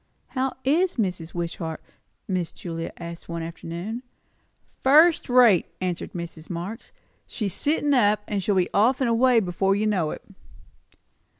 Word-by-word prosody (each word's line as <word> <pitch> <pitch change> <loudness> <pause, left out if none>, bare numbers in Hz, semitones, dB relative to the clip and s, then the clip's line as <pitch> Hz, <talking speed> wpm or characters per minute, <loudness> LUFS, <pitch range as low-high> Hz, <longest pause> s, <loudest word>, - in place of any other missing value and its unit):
"How 265 0 -1
is 340 +7 +2
Mrs. 180 -7 -3
Wishart?" 170 -1 -4 0.5
Miss 180 -3 -1
Julia 165 -2 -6
asked 170 0 -9
one 170 -1 -4
afternoon. 170 +7 -6 0.8
"First 310 +4 +5
rate," 245 -8 +5
answered 180 -2 -3
Mrs. 170 -2 -7
Marx. 180 +7 -6 0.4
"She's 205 -6 -2
sittin' 295 -1 +1
up. 210 -5 +3 0.2
She'll 195 +1 0
be 185 -2 +2
off 235 +6 +3
and 260 - +1
away 240 +1 +4
before 195 0 +1
you 210 +2 0
know 185 -7 +1
it." - - -7
195 Hz, 135 wpm, -25 LUFS, 170-250 Hz, 0.8 s, First